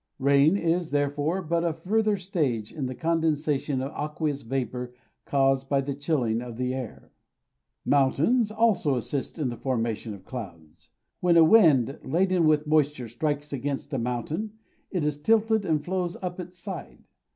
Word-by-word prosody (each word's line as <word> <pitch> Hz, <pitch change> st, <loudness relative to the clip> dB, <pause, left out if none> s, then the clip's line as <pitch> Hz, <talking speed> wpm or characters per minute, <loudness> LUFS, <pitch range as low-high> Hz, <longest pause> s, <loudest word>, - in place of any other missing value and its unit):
Rain 140 Hz, +6 st, +4 dB
is, 170 Hz, -1 st, 0 dB
therefore, 145 Hz, +5 st, 0 dB
but 170 Hz, +1 st, 0 dB
a 170 Hz, -2 st, 0 dB
further 210 Hz, +6 st, +1 dB
stage 150 Hz, -, -2 dB
in 145 Hz, -5 st, -3 dB
the 130 Hz, -, -5 dB
condensation 150 Hz, -4 st, 0 dB
of 135 Hz, -, -4 dB
aqueous 150 Hz, -1 st, -3 dB
vapour 125 Hz, 0 st, -4 dB, 0.3 s
caused 135 Hz, -1 st, +1 dB
by 140 Hz, -, +3 dB
the 140 Hz, +1 st, -2 dB
chilling 135 Hz, -6 st, 0 dB
of 120 Hz, -2 st, -8 dB
the 125 Hz, 0 st, -1 dB
air. 130 Hz, -4 st, -7 dB, 0.7 s
Mountains 150 Hz, -, +3 dB
also 215 Hz, -10 st, +2 dB
assist 130 Hz, +5 st, -3 dB
in 145 Hz, -5 st, -1 dB
the 120 Hz, -, -6 dB
formation 115 Hz, -4 st, -2 dB
of 95 Hz, -1 st, -16 dB
clouds. 85 Hz, -11 st, -9 dB, 0.3 s
When 175 Hz, -1 st, +3 dB
a 165 Hz, -, +8 dB
wind 155 Hz, -, +5 dB
laden 180 Hz, -1 st, +2 dB
with 155 Hz, 0 st, +3 dB
moisture 150 Hz, -5 st, +1 dB
strikes 145 Hz, +4 st, -2 dB
against 140 Hz, +2 st, -3 dB
a 135 Hz, -, 0 dB
mountain, 125 Hz, -, -3 dB, 0.4 s
it 180 Hz, -6 st, -1 dB
is 150 Hz, -1 st, -2 dB
tilted 220 Hz, +2 st, +2 dB
and 155 Hz, -4 st, 0 dB
flows 180 Hz, -1 st, -2 dB
up 180 Hz, 0 st, -4 dB
its 180 Hz, 0 st, -8 dB
side. 185 Hz, -1 st, -8 dB
150 Hz, 160 wpm, -26 LUFS, 130-170 Hz, 0.7 s, a